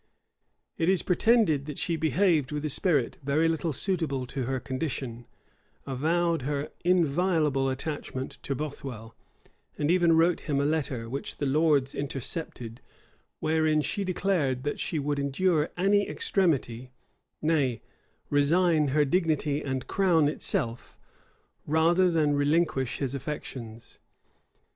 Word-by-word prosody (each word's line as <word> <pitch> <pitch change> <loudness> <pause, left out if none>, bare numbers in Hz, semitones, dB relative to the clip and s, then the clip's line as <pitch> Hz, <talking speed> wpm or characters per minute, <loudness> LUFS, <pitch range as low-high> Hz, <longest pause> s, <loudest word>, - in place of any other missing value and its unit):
It 165 - +2
is 190 -2 +2
pretended 180 - +3
that 150 - -6
she 170 - 0
behaved 160 -3 +2
with 150 0 -3
a 150 - -1
spirit 145 -7 +1
very 145 +4 +2
little 165 0 -1
suitable 155 -5 -1
to 130 0 -4
her 130 +1 -1
condition, 130 -3 -4 0.6
avowed 165 +4 0
her 140 +2 -3
inviolable 160 -5 +2
attachment 130 -1 -4
to 140 - -3
Bothwell,[*] 130 -6 -6 0.6
and 150 +2 +1
even 170 -2 +4
wrote 170 +1 +3
him 140 -1 +1
a 140 - +1
letter, 140 -6 -1
which 135 +4 -5
the 145 - -2
lords 145 -1 +2
intercepted, 130 -3 -5 0.6
wherein 155 -1 +2
she 200 +6 -2
declared, 175 -9 0
that 145 - -3
she 160 - -2
would 145 0 -1
endure 150 +3 +1
any 200 +2 +2
extremity, 145 - 0 0.5
nay, 145 -7 0 0.5
resign 155 +2 +3
her 145 +2 +2
dignity 155 -2 0
and 130 -3 -3
crown 175 -6 +2
itself, 120 -5 -1 0.7
rather 170 +4 +3
than 155 -3 +2
relinquish 145 -2 +1
his 135 -2 -2
affections. 120 -5 -7
150 Hz, 125 wpm, -27 LUFS, 135-165 Hz, 0.7 s, even